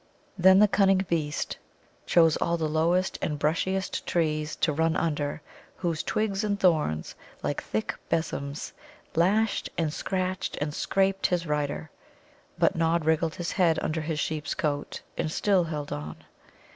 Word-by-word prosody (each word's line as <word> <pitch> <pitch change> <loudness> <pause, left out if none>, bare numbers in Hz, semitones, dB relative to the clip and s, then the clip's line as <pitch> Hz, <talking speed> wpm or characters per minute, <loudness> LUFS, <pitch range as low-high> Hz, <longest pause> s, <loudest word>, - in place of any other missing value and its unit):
Then 190 0 +6
the 210 +1 +7
cunning 195 -1 +3
beast 150 -3 -1 0.5
chose 165 -2 +5
all 170 0 0
the 160 -1 -1
lowest 170 +4 +1
and 150 - -1
brushiest 180 +6 0
trees 155 -2 0
to 155 - +1
run 160 +2 +1
under, 150 -2 -1 0.3
whose 170 -3 -1
twigs 210 -1 -1
and 205 -1 0
thorns, 155 - +1 0.3
like - - -1
thick 110 0 -2 0.2
besoms, 145 -3 -2 0.4
lashed 200 +6 +2
and 160 -3 0
scratched 185 +1 -2
and 150 0 -2
scraped 195 +3 +1
his 175 -1 0
rider. 150 0 -2 0.7
But - - +3
Nod 165 0 +1
wriggled 160 0 +1
his 175 -1 -3
head 170 -5 +3
under 160 +1 -1
his 155 0 -2
sheep's 155 -1 -2
coat, 145 -5 -2 0.2
and 155 - 0
still 190 0 +2
held 150 -3 -4
on. 75 +1 -6
165 Hz, 145 wpm, -27 LUFS, 150-185 Hz, 0.7 s, the